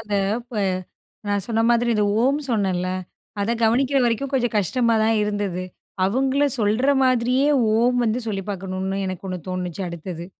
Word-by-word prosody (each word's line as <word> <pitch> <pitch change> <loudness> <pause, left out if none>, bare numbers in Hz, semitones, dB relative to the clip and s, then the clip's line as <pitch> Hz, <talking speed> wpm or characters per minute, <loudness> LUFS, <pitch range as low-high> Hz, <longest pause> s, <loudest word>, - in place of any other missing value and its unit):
அந்த 210 -2 -2 0.2
இப்ப, 240 -1 -10 0.7
நான் 205 -2 0
சொன்ன 225 -1 +1
மாதிரி 240 0 +3
இந்த 210 -1 +2 0.2
"ஓம்" 275 +3 +3
சொன்னேல, 190 -5 0 0.5
அத 220 +4 +1
கவனிக்குற 255 +5 +3
வரைக்கும் 245 +4 0
கொஞ்சம் 245 -3 +1
கஷ்டமா 230 +4 +1
தான் 225 0 +2
இருந்தது. 205 -3 -2 0.4
அவுங்களும் 270 +5 +1
சொல்ற 220 +5 +1 0.2
மாதிரியே 255 +2 +2 0.3
"ஓம்" 245 +2 +3
வந்து 230 +1 0
சொல்லி 195 -3 -2
பாக்கணும்னு 190 0 -3
எனக்கு 185 0 -5
ஒண்ணு 185 - -4
தோணுச்சு 180 0 -4
அடுத்தது, 170 0 -7
220 Hz, 150 wpm, -22 LUFS, 195-245 Hz, 0.7 s, மாதிரி